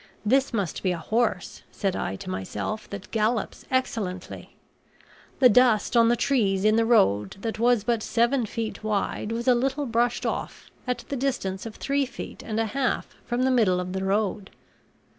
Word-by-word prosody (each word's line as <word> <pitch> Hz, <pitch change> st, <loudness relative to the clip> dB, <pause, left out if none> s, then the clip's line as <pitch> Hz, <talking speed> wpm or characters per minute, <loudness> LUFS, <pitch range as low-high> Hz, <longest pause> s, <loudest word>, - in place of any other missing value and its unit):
This 265 Hz, +5 st, +3 dB
must 200 Hz, -8 st, -2 dB
be 185 Hz, -, +1 dB
a -, -, -3 dB
horse, 215 Hz, +2 st, -1 dB
said 195 Hz, -2 st, -1 dB
I 95 Hz, -, -2 dB
to -, -, -8 dB
myself, 95 Hz, -, -4 dB
that 200 Hz, -2 st, -8 dB
gallops 220 Hz, 0 st, -1 dB
excellently. 205 Hz, -8 st, -3 dB, 0.8 s
The 260 Hz, -, +7 dB
dust 245 Hz, -1 st, +4 dB
on 230 Hz, -1 st, +6 dB
the 240 Hz, -, +4 dB
trees 210 Hz, -7 st, +1 dB
in 215 Hz, 0 st, +5 dB
the 230 Hz, 0 st, +3 dB
road 100 Hz, -, +3 dB
that 225 Hz, 0 st, -3 dB
was 240 Hz, -2 st, +3 dB
but 235 Hz, -1 st, 0 dB
seven 235 Hz, +2 st, +1 dB
feet 225 Hz, 0 st, -5 dB
wide 210 Hz, 0 st, -1 dB
was 235 Hz, +2 st, -3 dB
a 250 Hz, -, +7 dB
little 270 Hz, +4 st, 0 dB
brushed 240 Hz, 0 st, 0 dB
off, -, -, -4 dB, 0.2 s
at 250 Hz, -, -2 dB
the 280 Hz, -, -2 dB
distance 240 Hz, -7 st, -2 dB
of 220 Hz, -, -9 dB
three 280 Hz, -1 st, 0 dB
feet -, -, -8 dB
and 220 Hz, 0 st, -3 dB
a 225 Hz, -, +2 dB
half 260 Hz, +4 st, -1 dB
from 245 Hz, +1 st, -1 dB
the 260 Hz, -, +3 dB
middle 210 Hz, -8 st, +3 dB
of 180 Hz, 0 st, -4 dB
the 190 Hz, 0 st, -2 dB
road. 200 Hz, 0 st, -1 dB
225 Hz, 180 wpm, -25 LUFS, 195-245 Hz, 0.8 s, The